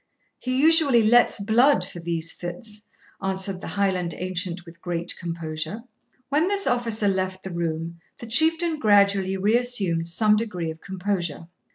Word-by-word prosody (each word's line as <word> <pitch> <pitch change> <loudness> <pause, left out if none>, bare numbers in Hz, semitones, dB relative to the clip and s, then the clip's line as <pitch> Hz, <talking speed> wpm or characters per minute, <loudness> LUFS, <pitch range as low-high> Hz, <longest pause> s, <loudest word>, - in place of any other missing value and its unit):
'He 255 0 -2
usually 300 -6 +5
lets 240 +1 +4
blood 235 +8 +3
for 175 - -10
these 165 -1 -2
fits,' 210 +5 -7 0.3
answered 190 0 -2
the - - -7
Highland 185 -4 -1
ancient 180 -1 -4
with 170 0 -15
great 175 -1 -4
composure. 165 +3 -5 0.5
When 300 +5 +2
this 400 0 +2
officer 230 -4 0
left 190 -1 -1
the 190 - -6
room, 165 0 -4 0.2
the - - -9
Chieftain 320 +6 +2
gradually 200 -3 +3
reassumed 205 -5 +1
some 210 +5 +3
degree 185 -7 -2
of 160 - -12
composure. 180 -4 -4
195 Hz, 145 wpm, -24 LUFS, 170-230 Hz, 0.5 s, usually